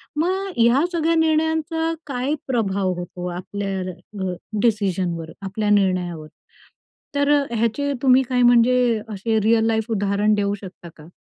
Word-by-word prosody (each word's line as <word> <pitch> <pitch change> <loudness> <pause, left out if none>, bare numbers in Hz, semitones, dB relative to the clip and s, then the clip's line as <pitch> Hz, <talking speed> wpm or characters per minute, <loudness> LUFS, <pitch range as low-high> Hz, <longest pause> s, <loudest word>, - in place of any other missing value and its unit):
मग 375 +5 -1
या 235 +4 +4
सगळ्या 330 -1 +1
निर्णयांचा 320 0 +1
काय 265 +1 -2
प्रभाव 200 -7 0
होतो 180 0 -6
आपल्या 195 +1 -4 0.4
अ, 185 -1 -2 0.3
डिसिजनवर, 185 -7 0
आपल्या 205 +2 -2
निर्णयावर, 180 -6 +1 0.9
तर 285 0 +2 0.2
ह्याचे 235 +5 0
तुम्ही 260 -1 +5
काय, 250 -1 +1
म्हणजे 240 -1 +4
असे 220 +2 -1
रिअल 225 +1 +3
लाईफ 225 0 0
उदाहरण 205 0 +1
देऊ 200 -1 0
शकता 180 -2 -10
का? 155 +1 -14
220 Hz, 130 wpm, -22 LUFS, 195-265 Hz, 0.9 s, तुम्ही